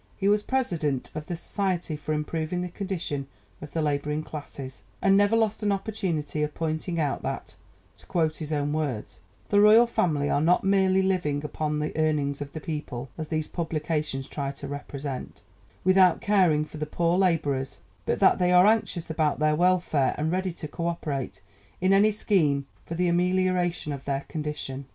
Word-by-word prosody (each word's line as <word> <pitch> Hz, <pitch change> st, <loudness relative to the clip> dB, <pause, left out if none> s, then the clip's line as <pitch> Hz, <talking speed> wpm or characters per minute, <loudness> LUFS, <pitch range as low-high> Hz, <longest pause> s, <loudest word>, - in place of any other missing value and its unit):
He 195 Hz, -, 0 dB
was 210 Hz, +1 st, +4 dB
President 170 Hz, -, -1 dB
of 155 Hz, -1 st, -6 dB
the 175 Hz, -, -3 dB
Society 180 Hz, -2 st, -2 dB
for 150 Hz, +1 st, -5 dB
Improving 155 Hz, +3 st, -2 dB
the 180 Hz, -, -3 dB
Condition 170 Hz, -8 st, -3 dB, 0.3 s
of 150 Hz, -, -7 dB
the 160 Hz, +1 st, -1 dB
Labouring 150 Hz, +1 st, -1 dB
Classes, 140 Hz, -3 st, -8 dB, 0.2 s
and 195 Hz, 0 st, +4 dB
never 205 Hz, +2 st, +4 dB
lost 220 Hz, -1 st, +1 dB
an 210 Hz, -1 st, +1 dB
opportunity 190 Hz, -8 st, -2 dB
of 150 Hz, 0 st, -2 dB
pointing 165 Hz, +2 st, -2 dB
out 145 Hz, -3 st, 0 dB
that, -, -, -5 dB, 0.4 s
to -, -, -15 dB
quote 160 Hz, -3 st, 0 dB
his 155 Hz, 0 st, -5 dB
own 145 Hz, -1 st, 0 dB
words, 145 Hz, -9 st, -3 dB, 0.3 s
"the 205 Hz, 0 st, +5 dB
Royal 215 Hz, +3 st, +8 dB
Family 155 Hz, -11 st, 0 dB
are 145 Hz, -, +1 dB
not 175 Hz, +3 st, +3 dB
merely 190 Hz, -1 st, +3 dB
living 150 Hz, -6 st, 0 dB
upon 150 Hz, 0 st, -2 dB
the 150 Hz, 0 st, -3 dB
earnings 150 Hz, -3 st, 0 dB
of 140 Hz, -1 st, -6 dB
the 155 Hz, -, -4 dB
people 150 Hz, -5 st, -5 dB
(as 160 Hz, -1 st, -5 dB
these 155 Hz, -1 st, -2 dB
publications 155 Hz, -4 st, -2 dB
try 140 Hz, -1 st, -3 dB
to 140 Hz, 0 st, -7 dB
represent) 140 Hz, -4 st, -6 dB, 0.4 s
without 185 Hz, -2 st, +5 dB
caring 185 Hz, -8 st, +3 dB
for 155 Hz, -, -10 dB
the 150 Hz, 0 st, -3 dB
poor 170 Hz, +2 st, +1 dB
labourers, 150 Hz, -8 st, +1 dB, 0.3 s
but -, -, +1 dB
that -, -, +5 dB
they 180 Hz, 0 st, +3 dB
are 180 Hz, +1 st, +7 dB
anxious 210 Hz, -6 st, +1 dB
about 155 Hz, -2 st, +1 dB
their 155 Hz, 0 st, +2 dB
welfare, 175 Hz, -6 st, +2 dB
and 155 Hz, +2 st, 0 dB
ready 185 Hz, +1 st, 0 dB
to 165 Hz, -2 st, -7 dB
co 170 Hz, +3 st, -3 dB
operate 150 Hz, -6 st, -3 dB, 0.4 s
in 185 Hz, +2 st, +3 dB
any 200 Hz, +2 st, +6 dB
scheme 160 Hz, -10 st, +1 dB, 0.2 s
for 165 Hz, -, -4 dB
the 180 Hz, +1 st, +1 dB
amelioration 180 Hz, -2 st, +1 dB
of 140 Hz, -1 st, -8 dB
their 140 Hz, -1 st, -1 dB
condition. 150 Hz, -3 st, -5 dB
160 Hz, 180 wpm, -26 LUFS, 150-185 Hz, 0.4 s, Royal